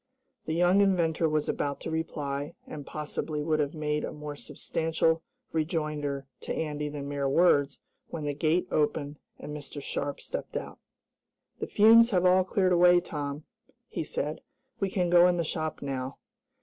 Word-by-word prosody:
The 160 - -1
young 180 +3 +4
inventor 170 -4 +2
was 155 -1 0
about 140 -1 -2
to - - -4
reply, 145 -3 -3
and, 145 -2 -8
possibly 150 0 -3
would 155 0 +1
have 145 +1 -1
made 150 -1 -1
a - - -3
more 150 -1 -7
substantial 160 +2 -1 0.3
rejoinder 150 -3 -2
to - - -4
Andy 150 -1 -2
than 145 -1 -6
mere 140 -1 -1
words, 145 -2 +3 0.3
when 160 - -6
the 145 -1 -1
gate 160 +5 +1
opened, 150 -1 0 0.2
and 150 - -7
Mr. 145 0 -7
Sharp 140 0 -3
stepped - - -5
out. - - -7 0.8
"The - - -3
fumes 230 +2 +7
have 185 -5 +2
all 185 +1 +5
cleared 185 0 +2
away, 175 0 +6
Tom," 145 -3 -5 0.5
he - - -3
said. 150 0 -3 0.4
"We 195 - 0
can 180 -2 0
go 175 0 +7
in 180 -1 +2
the 170 - +1
shop, 155 -1 -3
now." 135 -1 -4
155 Hz, 165 wpm, -28 LUFS, 145-175 Hz, 0.8 s, fumes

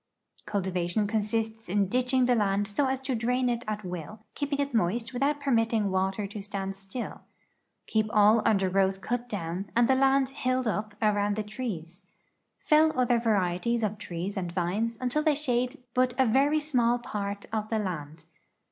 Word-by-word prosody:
Cultivation 190 0 0
consists 220 0 -2
in 200 +1 +2
ditching 255 +3 +2
the 250 - +3
land 205 -2 +1
so 265 +7 0
as 265 0 0
to 265 0 -2
drain 250 +2 +1
it 240 0 -1
at 215 0 -3
will, 180 +4 -6
keeping 285 -1 -2
it 280 -1 -1
moist 225 +3 0
without 280 +4 +1
permitting 225 -6 +1
water 190 +2 0
to 205 +1 -6
stand. 195 -1 -4 1.1
Keep 215 -1 +1
all 215 +1 +5
undergrowth 195 -1 +2
cut 245 +4 -3
down 185 -1 -4
and 235 0 +4
the 265 - +4
land 270 0 +3
"'hilled 255 -2 -1
up" 210 -1 -2
around 205 -1 +2
the 215 - -2
trees. 205 -6 -6 0.6
Fell 310 0 +4
other 245 -1 +3
varieties 220 +1 +1
of 210 -1 -1
trees 185 0 -4
and 175 -3 -3
vines 200 +7 -1
until 255 +4 0
they 305 -1 +3
shade 255 -2 -1 0.2
but 250 -1 +2
a 265 - +4
very 275 +6 +3
small 245 -6 +2
part 200 -3 -4
of 215 -1 -2
the 225 - 0
land. 160 -6 -5
220 Hz, 165 wpm, -28 LUFS, 195-250 Hz, 1.1 s, all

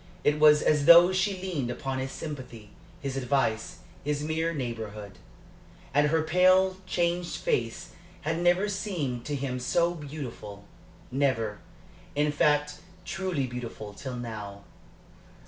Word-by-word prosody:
It 150 +1 +2
was 150 0 +6
as 150 -2 +2
though 175 +2 +9
she 190 0 0
leaned 170 -10 -3
upon 130 +2 -3
his 130 0 -3
sympathy, 125 -8 -8 0.3
his 135 -3 -3
advice, 130 -4 -1 0.2
his 145 0 -1
mere 160 +2 0
neighborhood. 110 -7 -6 0.7
And 145 +1 +4
her 160 +1 +2
pale, 185 +3 +4
changed 175 -1 0
face 480 -3 -2 0.3
had 160 +1 -1
never 175 +3 +3
seemed 175 - -3
to 145 - -2
him 130 -2 -3
so 170 +7 +1
beautiful 135 -10 -8 0.5
never, 120 -6 0 0.6
in 150 +1 +2
fact, 150 -1 +1 0.3
truly 170 -6 -2
beautiful 120 -4 -7
till 130 +4 -6
now. 105 -4 -7
145 Hz, 130 wpm, -28 LUFS, 125-170 Hz, 0.7 s, though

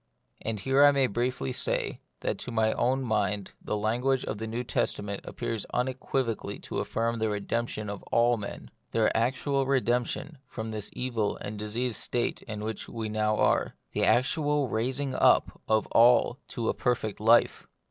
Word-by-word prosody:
And 110 -1 -3
here 135 +6 +4
I 145 - +9
may 140 -2 +3
briefly 120 - -1
say - - -1 0.2
that - - -2
to 125 - -6
my 110 -1 +2
own 130 +2 +1
mind 105 -4 0
the 105 - -2
language 125 +5 +1
of 105 - -4
the 110 - -4
New 115 +2 -3
Testament 100 -4 -2
appears 115 -3 -4
unequivocally 125 -2 -1
to - - -4
affirm 115 +1 -1
the 110 0 +1
redemption 105 +1 -2
of 100 -1 -5
all 120 +1 +4
men; 105 -3 -7 0.2
their 110 -1 +2
actual 135 +3 +1
redemption 130 +3 0
from 110 -3 -5
this 105 -2 -3
evil 115 -5 -1
and 105 0 -6
diseased 110 +2 -1
state 120 - -1
in 105 -1 -6
which 110 -1 -4
we 110 -2 -4
now 110 0 +1
are; - - +2 0.2
the - - 0
actual 145 +1 +2
rais 125 +5 -1
ing 140 -2 -1
up - - +3
of 110 0 +3
all 120 +2 +5
to 115 -3 -3
a - - +2
perfect 110 -4 -1
life. 115 +2 +4
115 Hz, 170 wpm, -28 LUFS, 110-125 Hz, 0.2 s, I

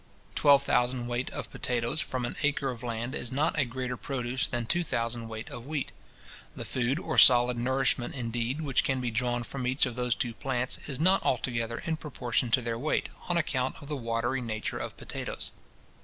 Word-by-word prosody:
Twelve 140 -1 +6
thousand 125 -1 +2
weight 120 +1 -2
of - - -6
potatoes 120 +5 0
from 125 -2 -2
an 120 - -4
acre 140 -2 +1
of 120 -2 -8
land 120 +1 -3
is 120 -5 -3
not 145 +4 +1
a 140 - +4
greater 125 +1 -3
produce 130 0 -2
than 120 -1 -2
two 175 +9 +1
thousand 115 -5 -2
weight 110 0 -7
of 120 +2 -8
wheat. 150 -3 -2 0.6
The - - -5
food 130 +2 0
or 165 -2 +1
solid 125 0 +8
nourishment, 130 +1 +1
indeed, 120 +3 -2
which 135 -4 +2
can 130 -1 +1
be 125 -2 -1
drawn 120 +1 0
from 125 +1 -4
each 130 +3 +3
of 125 -2 -4
those 125 -1 +1
two 120 -3 -2
plants, 130 0 -1
is 140 -2 -3
not 185 +4 +5
altogether 115 -2 0
in 160 -1 0
proportion 125 -5 -1
to 125 +2 +3
their 115 -1 -2
weight, 155 +5 0 0.2
on 175 - +3
account 130 -5 0
of 145 -2 -11
the 150 - -1
watery 120 +1 -1
nature 110 -2 -3
of - - -5
potatoes. - - -5
125 Hz, 200 wpm, -29 LUFS, 120-135 Hz, 0.6 s, solid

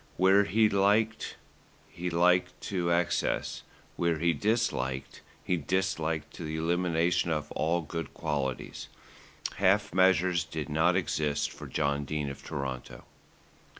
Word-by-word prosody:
Where 95 +2 +5
he 110 +4 +4
liked, 105 +3 +1 0.5
he 90 +1 -4
liked 90 +2 +2
to 90 -3 -1
excess; 85 0 0 0.4
where 85 -2 +1
he 85 +2 +2
disliked, 75 - -1 0.2
he 90 - 0
disliked 80 -2 -1
to - - -8
the 80 0 -4
elimination 85 +1 +1
of 75 -2 -2
all 85 +3 0
good 80 0 -5
qualities. 70 -5 -3 0.7
Half 95 -1 +3
measures 95 -2 +4
did 80 -1 -5
not 80 +4 +3
exist 75 -5 0
for - - -9
John 70 0 0
Dene 75 -1 -2
of 70 - -11
Toronto. 65 -2 -5
85 Hz, 125 wpm, -29 LUFS, 75-95 Hz, 0.7 s, Where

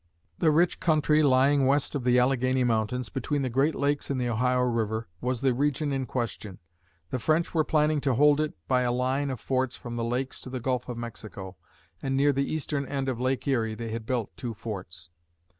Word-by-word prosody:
The 160 - +4
rich 170 +3 +3
country 155 -3 +3
lying 135 0 +4
west 140 +1 +1
of 140 -4 -2
the 125 0 +3
Alleghany 130 0 +2
Mountains, 115 +1 0
between 140 +2 -2
the 130 - -2
Great 140 +5 +2
Lakes 145 +1 0
and 135 -2 -1
the 125 -1 0
Ohio 125 +2 +1
River, 115 -2 -1
was 125 -1 -1
the 135 -2 +3
region 145 +2 0
in 135 -1 -2
question. 110 -5 -4 0.5
The 130 - -1
French 155 +7 +1
were 160 -2 +3
planning 150 -1 +2
to 135 -3 +1
hold 145 +3 +5
it 155 - -2
by 125 -1 +3
a 125 -1 +1
line 130 +3 0
of 130 - -4
forts 130 -1 -1
from 120 -1 -7
the 115 - -1
Lakes 125 +3 -2
to - - -8
the 130 0 -4
Gulf 125 +1 -2
of 120 - -4
Mexico, 110 -5 -7 0.5
and 135 0 -1
near 145 +1 +4
the 140 +1 -1
eastern 145 -3 -2
end 135 -1 -2
of 125 -3 -3
Lake 130 +2 -1
Erie, 115 -5 +1
they 115 0 -5
had 115 0 -5
built 120 -4 -2
two 120 -3 -5
forts. 90 -6 -7
130 Hz, 210 wpm, -27 LUFS, 120-140 Hz, 0.5 s, hold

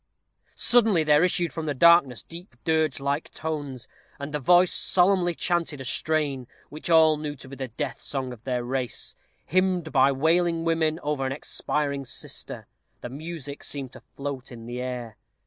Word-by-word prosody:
Suddenly 225 -8 +4
there 150 +1 +5
issued 175 -1 +1
from 160 -2 -4
the 145 - -1
darkness 155 -4 +5
deep 170 -5 -10
dirge 160 -4 +1
like 140 +2 -2
tones, 145 -6 -5 0.3
and 140 +1 -6
a 150 - 0
voice 175 +6 +5
solemnly 180 -2 +3
chanted 170 -5 -1
a 135 - -6
strain, 140 -2 0 0.2
which 155 +3 -7
all 160 -2 +6
knew 150 -1 -4
to 130 - -11
be 135 - -9
the 135 -1 -4
death 130 +3 -5
song 130 -3 -4
of 120 -2 -14
their 125 -1 -1
race, 130 -1 -3 0.3
hymned 185 -3 +1
by 135 0 +5
wailing 165 +4 +2
women 160 -1 +1
over 145 -2 -1
an 130 - -1
expiring 140 0 -1
sister. 130 - -4 0.4
The 120 - -6
music 145 0 -7
seemed 135 -3 -4
to 130 - -12
float 140 -2 -5
in 115 -2 -9
the 120 +1 -5
air. 120 -4 -5
150 Hz, 170 wpm, -26 LUFS, 130-165 Hz, 0.4 s, all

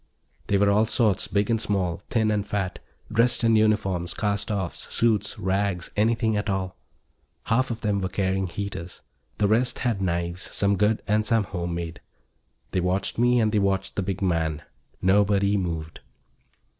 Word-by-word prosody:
They 100 - +2
were 100 0 +4
all 105 +2 +3
sorts, 110 -5 +1
big 100 +2 0
and 115 -1 +1
small, 95 -5 -1
thin 110 -2 +2
and 105 -1 0
fat, 100 -2 -3 0.3
dressed 120 +2 +3
in 115 -1 +4
uniforms, 105 -5 +1
cast 105 0 -1
offs, 95 -5 -4
suits, 105 -3 +1
rags, 95 -2 -1
anything 110 +1 +2
at 105 0 -1
all. 95 -1 -2 0.7
Half 130 +4 +1
of 115 -1 -4
them 105 -2 0
were 95 - -1
carrying 95 -1 0
heaters. 90 -1 -6 0.4
The 105 - +2
rest 120 +4 +2
had 115 -5 0
knives, 85 0 -2
some 100 0 +2
good 105 +2 +1
and 105 +1 +2
some 115 0 +2
home 85 -3 -4
made. 85 -1 -5 0.7
They 90 - 0
watched 95 +4 -1
me 120 +1 +4
and 110 -2 +2
they 105 - +2
watched 95 -1 0
the - - 0
big 95 0 -3
man. 80 -4 0 0.4
Nobody 100 +1 +3
moved. 80 -4 -3
100 Hz, 170 wpm, -25 LUFS, 95-110 Hz, 0.7 s, were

